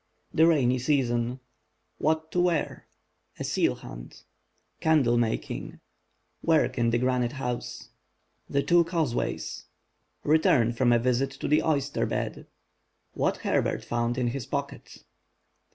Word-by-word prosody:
THE 160 +1 +5
RAINY 130 -6 +3
SEASON—WHAT 130 +4 -2
TO 180 - +1
WEAR 175 -3 -1 0.5
A - - -4
SEAL - - +1
HUNT—CANDLE 120 - -3
MAKING— 115 -2 -2 0.6
WORK 160 -5 +2
IN 115 0 +3
THE 120 - +2
GRANITE 125 0 0
HOUSE—THE 135 +1 -6
TWO 175 0 +5
CAUSEWAYS—RETURN 150 -3 -1
FROM 120 +1 +2
A 120 - +5
VISIT 125 +3 +1
TO 135 - -6
THE 150 - +4
OYSTER 145 -4 0
BED—WHAT - - -5
HERBERT - - 0
FOUND 120 +1 -1
IS 120 -2 0
HIS 135 -4 -4
POCKET. - - -5
130 Hz, 105 wpm, -27 LUFS, 120-155 Hz, 0.6 s, THE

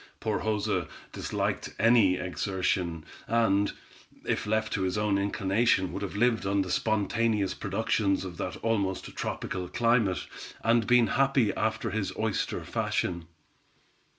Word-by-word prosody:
Poor 110 -2 -1
Joza 105 -2 -1 0.2
disliked - - -3
any 115 -5 +5
exertion, 90 -1 -2 0.2
and, 105 -3 +2 0.5
if - - -1
left 110 +1 0
to 95 - -1
his 95 +1 0
own 105 -1 +1
inclination, 100 0 +1
would 100 - -4
have 100 -1 -4
lived 115 0 +2
on 100 0 +1
the 90 - -5
spontaneous 110 -1 +1
productions 100 -2 0
of 90 -2 -7
that 90 - -4
almost 100 -4 -1
tropical 90 -1 -3
climate, 115 -3 +1 0.4
and 115 -1 +3
been 125 -1 +5
happy 135 -3 +2
after 110 0 -1
his 110 -2 -2
oyster 110 -2 -1
fashion. 85 -2 -2
105 Hz, 130 wpm, -28 LUFS, 95-115 Hz, 0.5 s, any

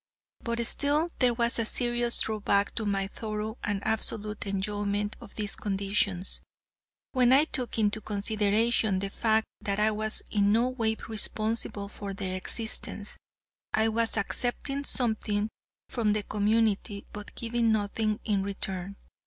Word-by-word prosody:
But 235 0 -1
still 295 +7 +1
there 245 -2 +4
was 235 0 +4
a 230 - +1
serious 240 -1 +2
drawback 205 -2 +1
to 220 -2 -2
my 195 -1 +1
thorough 215 +2 -4
and 205 -2 -2
absolute 215 -1 -1
enjoyment 205 +1 -1
of 225 -4 -12
these 210 -2 -1
conditions, 195 -2 0 0.7
when 250 -2 +4
I 280 +4 +7
took 255 -7 -2
into 215 0 +1
consideration 210 0 +2
the 195 +1 -2
fact 220 0 +2 0.2
that 200 0 -1
I 215 +1 +4
was 215 0 -1
in 205 -1 +3
no 235 +4 +3
way 225 -3 0
responsible 215 -1 0
for 200 -1 -6
their 190 -2 -3
existence. 210 +1 -2 0.6
I 220 0 +3
was 225 0 +1
accepting 255 +6 -1
something 220 -4 +1 0.4
from 220 -4 +1
the 210 0 -1
community, 210 -1 +1
but 210 -1 -8
giving 235 -1 +1
nothing 215 0 0
in 205 -3 +2
return. 195 -1 -3
215 Hz, 140 wpm, -29 LUFS, 205-230 Hz, 0.7 s, I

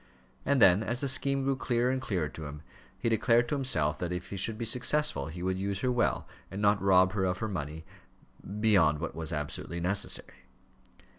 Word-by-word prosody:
And 140 -1 +3
then 95 -2 +6
as 120 +3 -3
the 140 - -1
scheme 135 +1 +2
grew 135 0 +1
clearer 125 -1 0
and 130 0 -2
clearer 95 -10 -1
to 80 +1 -9
him, 75 +1 -9 0.3
he - - -3
declared 115 +1 +3
to - - -1
himself 80 - +1
that 90 -1 -3
if 90 0 -5
he - - -4
should 110 +3 -1
be 115 - -3
successful, 125 - +1
he 85 +3 -7
would 95 0 -1
use 100 0 -3
her 125 - +1
well, 120 -1 0 0.2
and 95 - -6
not 105 0 +2
rob 95 -1 +4
her 100 -2 -1
of 90 0 -1
her 110 - -3
money 80 -5 -5 0.7
beyond 95 -9 +4
what 85 - -4
was 80 +1 -6
absolutely 80 +3 -3
necessary. 90 +4 -3
100 Hz, 205 wpm, -29 LUFS, 85-120 Hz, 0.7 s, then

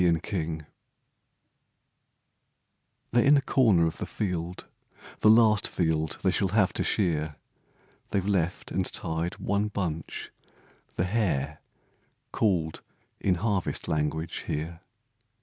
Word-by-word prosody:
END 80 -2 0 2.5
OF 120 -1 +5
in 145 +2 +6
the 140 - +4
corner 110 -12 +4
of 80 0 -3
the - - -4
field, 90 -4 -3 0.3
* - - -19
The 110 - +5
last 110 -2 +5
field 80 -3 0
they 95 - +3
shall 95 - +1
have 95 0 +2
to - - -1
shear, 80 -6 +1 0.7
They've 95 -2 0
left 90 -3 0
and 95 - +1
tied 80 +1 -1
one 100 +2 0
bunch, 85 -7 -4 0.3
* - - -31
the 90 - 0
hare/ 80 -9 0 0.7
Called 85 -7 0 0.4
in 95 - +2
harvest 100 0 -1
language 80 +1 -2
here. 80 +3 -4
90 Hz, 120 wpm, -27 LUFS, 80-100 Hz, 2.5 s, in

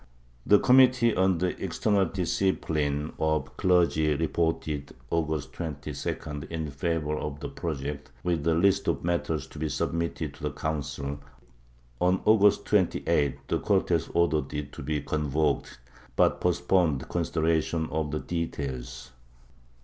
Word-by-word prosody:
The 105 - +7
com 130 +3 +6
mittee 125 -3 +5
on 95 -1 +3
the 90 +2 -2
external 95 +2 +1
discipline 80 -5 -1
of 80 -3 +1
the 65 - -19
clergy 85 -4 +2
reported, 80 -2 -1 0.2
August 75 -4 -1
22d, 75 -1 -5
in 80 -3 -4
favor 75 +1 -1
of 75 -1 -4
the - - -5
project, 75 -3 -5
with 85 -3 0
a 80 - +4
list 95 +3 +3
of - - 0
matters 85 -2 -1
to - - -11
be 80 0 -1
submitted 85 +2 -2
to - - -16
the - - -1
Council; 70 -2 -3 0.8
on 90 +1 +3
August 105 -1 +5
28th 85 -8 +1
the - - 0
Cortes 90 -5 +1
ordered 80 -5 +2
it 75 -1 -4
to - - -8
be 75 +2 -2
convoked, 75 0 -1 0.4
but - - +3
postponed 90 -5 +1
consideration 80 -1 0
of 80 -1 -1
the 75 +1 -3
details. 65 -7 -4
80 Hz, 135 wpm, -27 LUFS, 75-90 Hz, 0.8 s, The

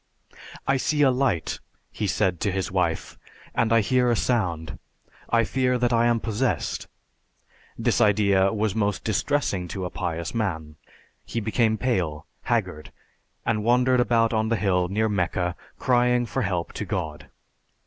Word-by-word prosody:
"I 135 - +2
see 145 +3 +1
a 135 - +5
light," 125 -10 0 0.3
he 105 - -2
said 95 -3 0
to 100 - 0
his 95 -1 -2
wife, - - -1 0.3
"and 115 -1 +1
I 115 -1 +5
hear 125 +2 +2
a 120 - +3
sound. 85 -11 -1 0.5
I 115 0 +3
fear 125 +2 +1
that 120 0 +1
I 115 0 +4
am 120 -1 +2
possessed." 115 +3 -2 0.9
This - - +1
idea 100 -2 +4
was 110 -2 0
most 105 -1 -1
distressing 110 -4 0
to 95 +1 -4
a 90 - -5
pious 85 -2 -3
man. 80 -9 -3 0.5
He 115 - -3
became 110 0 +1
pale, 90 -11 -1 0.2
haggard; 75 0 -2 0.6
he 115 - +2
wandered 125 +3 +3
about 115 -1 +2
on 110 0 +1
the 115 - +2
hill 95 -3 +1
near 110 +4 0
Mecca 90 -3 -1 0.2
crying 125 -1 +2
for 130 +3 -2
help 90 -6 -2
to 105 - -4
God. 85 -6 -4
110 Hz, 155 wpm, -25 LUFS, 95-120 Hz, 0.9 s, a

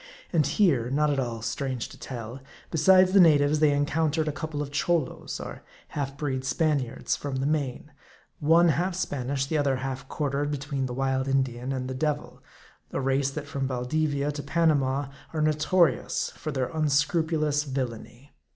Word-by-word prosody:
And 155 -5 +3
here 145 - +2
not 150 +2 +2
at 140 - 0
all 115 -3 -3
strange 125 +1 -2
to - - -13
tell 120 0 -7 0.3
besides 185 +3 +5
the 200 - +7
natives, 150 -3 +5
they 155 -1 +5
encountered 155 +2 +1
a - - +1
couple 150 +1 -5
of 145 -1 -3
Cholos, 155 0 -1
or - - -7 0.3
half 140 -1 -4
breed 135 -3 -2
Spaniards, 140 -3 0
from 140 -2 -5
the 130 +1 -1
Main; 150 -1 -2 0.5
one 165 +3 +5
hUlf 175 +4 0
Spanish, 135 -5 -2
the 155 +2 0
other 140 -2 +2
half 130 0 -5
quartered 145 -1 -1
between 140 -2 -2
the 125 - -5
wild 135 0 0
Indian 130 -2 0
and 130 -1 -3
the 130 - -4
devil; 150 +2 -2 0.5
a - - -2
race, 135 +1 +1
that 145 +1 -6
from 140 -1 -3
Baldivia 140 +3 -1
to 145 0 -5
Panama 145 -3 +1 0.2
are 155 - -1
notorious 155 +3 +2
for 155 - -6
their 130 -3 -1
unscrupulous 155 0 +1
villainy. 130 -1 -5
145 Hz, 165 wpm, -27 LUFS, 135-155 Hz, 0.5 s, the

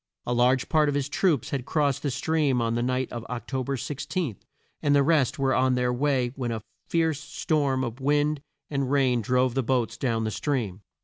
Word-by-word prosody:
A 120 - 0
large 125 +2 +3
part 155 -2 +3
of 145 - -1
his 140 -1 0
troops 155 - +1
had 135 -3 -1
crossed 145 -4 +1
the 145 - -1
stream 140 0 +1
on 115 -1 0
the 120 - 0
night 130 +1 -1
of 120 -1 -5
Oc 120 -1 -5
to 130 -1 -1
ber 135 +2 -2
16, 145 - -3 0.5
and 145 -1 +3
the 140 - +5
rest 145 -4 +2
were 135 -1 +1
on 130 0 +3
their 125 0 +1
way 130 -2 +1
when 125 -3 -2
a 110 -2 -4 0.2
fierce 160 -3 +1
storm 150 -3 0
of 120 0 -4
wind 145 +1 +1 0.3
and 140 -3 -1
rain 130 -4 +2
drove 125 +2 +2
the 135 - +1
boats 125 -2 0
down 115 -4 0
the 110 - -1
stream. 110 -8 -2
130 Hz, 210 wpm, -26 LUFS, 125-145 Hz, 0.5 s, the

